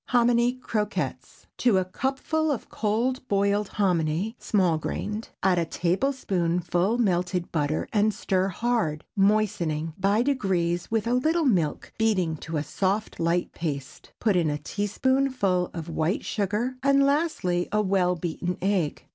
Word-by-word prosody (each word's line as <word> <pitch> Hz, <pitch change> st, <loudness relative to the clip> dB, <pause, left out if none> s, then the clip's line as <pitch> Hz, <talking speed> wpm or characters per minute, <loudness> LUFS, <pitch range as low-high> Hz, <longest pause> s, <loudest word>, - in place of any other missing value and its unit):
HOMINY 240 Hz, 0 st, +3 dB
CROQUETTES. 210 Hz, -, -3 dB
✠ -, -, -63 dB
To 235 Hz, -6 st, +3 dB
a 185 Hz, -, +1 dB
cupful 275 Hz, -, -1 dB
of 265 Hz, -, -4 dB
cold 240 Hz, +5 st, -1 dB
boiled 200 Hz, 0 st, +1 dB
hominy 180 Hz, +2 st, 0 dB
(small 180 Hz, -6 st, +2 dB
grained) 210 Hz, +7 st, -4 dB
add 185 Hz, -2 st, +3 dB
a 170 Hz, -, +1 dB
tablespoonful 180 Hz, -1 st, 0 dB
melted 180 Hz, -5 st, 0 dB
butter 150 Hz, -1 st, -1 dB
and 215 Hz, 0 st, +3 dB
stir 190 Hz, -2 st, 0 dB
hard, 195 Hz, -6 st, -1 dB
moistening, 195 Hz, -6 st, +1 dB
by 200 Hz, +4 st, +3 dB
degrees, 185 Hz, -10 st, 0 dB
with 220 Hz, -1 st, 0 dB
a 235 Hz, -, +1 dB
little 315 Hz, +6 st, +2 dB
milk, 180 Hz, -, 0 dB
beating 190 Hz, -8 st, +2 dB
to 160 Hz, +1 st, -4 dB
a 145 Hz, -, -1 dB
soft 195 Hz, +7 st, -1 dB
light 170 Hz, +1 st, 0 dB
paste. 145 Hz, -3 st, -5 dB
Put 210 Hz, -4 st, +2 dB
in 170 Hz, -3 st, +2 dB
a 145 Hz, -, -1 dB
teaspoonful 205 Hz, -, 0 dB
of 165 Hz, -2 st, -6 dB
white 165 Hz, +4 st, -1 dB
sugar, 215 Hz, +5 st, -1 dB
and 275 Hz, 0 st, +4 dB
lastly, 280 Hz, -, 0 dB
a 210 Hz, 0 st, +2 dB
well 185 Hz, -2 st, +2 dB
beaten 175 Hz, +1 st, -3 dB
egg. 190 Hz, -5 st, -1 dB
195 Hz, 145 wpm, -26 LUFS, 175-230 Hz, -, and